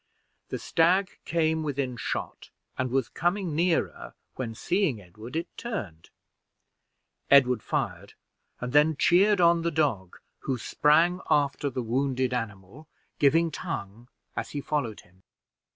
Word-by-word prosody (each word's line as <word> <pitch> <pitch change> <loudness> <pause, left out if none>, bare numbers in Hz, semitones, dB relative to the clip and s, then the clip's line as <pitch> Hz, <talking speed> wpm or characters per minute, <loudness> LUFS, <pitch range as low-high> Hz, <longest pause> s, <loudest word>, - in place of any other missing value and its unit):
The - - -3
stag 185 +4 +2
came 160 -1 +1
within 140 -4 -2
shot, 115 - -5 0.3
and 130 0 -1
was 130 -2 0
coming 175 -1 -1
nearer, 170 +1 0 0.2
when, 115 -4 -5
seeing 175 - 0
Edward, 105 - -11
it 165 +2 -2
turned. 110 - -6 1.2
Edward 130 -3 +5
fired, - - -3 0.4
and 125 +1 -5
then 150 +1 +4
cheered 195 +6 +4
on 170 -1 +5
the 170 - 0
dog, 135 - -1 0.2
who 130 -2 -2
sprung 165 - +3
after 145 0 +2
the 125 -1 -4
wounded 130 +1 0
animal, 115 +4 -6 0.3
giving 165 +3 +4
tongue, 120 - -6 0.3
as - - -4
he 145 - -4
followed 140 -7 -2
him. 95 +2 -26
140 Hz, 130 wpm, -27 LUFS, 120-165 Hz, 1.2 s, Edward